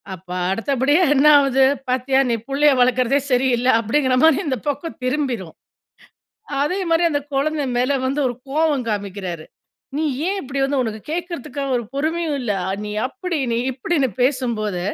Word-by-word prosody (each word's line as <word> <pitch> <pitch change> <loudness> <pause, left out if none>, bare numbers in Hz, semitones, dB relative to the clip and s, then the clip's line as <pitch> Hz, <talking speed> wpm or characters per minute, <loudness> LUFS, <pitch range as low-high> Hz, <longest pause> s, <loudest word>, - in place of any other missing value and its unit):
அப்ப 185 +1 -20 0.2
அடுத்தபடியா 275 - +2
என்ன 275 - +3
ஆகுது? 270 -1 +4 0.2
"பாத்தியா 260 +1 +1
நீ - - +2
புள்ளைய 285 +1 +4
வளக்றதே 255 +2 +3
சரியில்ல" 250 -1 +2
அப்டிங்ற 255 +3 +1
மாரி 320 0 +5
இந்த 260 -5 -1
பக்கம் 320 +2 -5
திரும்பிரும். 255 - -2 1.1
அதே 365 +7 -1
மாரி 330 +1 +3
அந்த 290 -2 0
குழந்த 300 +2 0
மேல 250 +3 +2
வந்து 275 +3 -1
ஒரு 245 - -4 0.2
கோவம் 295 -4 +1
காமிக்கிறாரு. 195 -5 -4 0.5
நீ 315 - 0 0.2
ஏன் 400 - -1
இப்டி 275 0 -4
வந்து 275 0 0
உனக்கு 220 -2 -4
கேட்கறதுக்கா 330 -5 -4
ஒரு 240 - 0
பொறுமையும் 315 +1 -1
இல்ல? 225 -4 -1 0.3
நீ 210 - -5 0.2
அப்டி, 360 +2 -4
நீ - - +1
இப்டின்னு 270 +2 0
பேசும்போது, 235 -8 0
265 Hz, 150 wpm, -20 LUFS, 245-295 Hz, 1.1 s, மாரி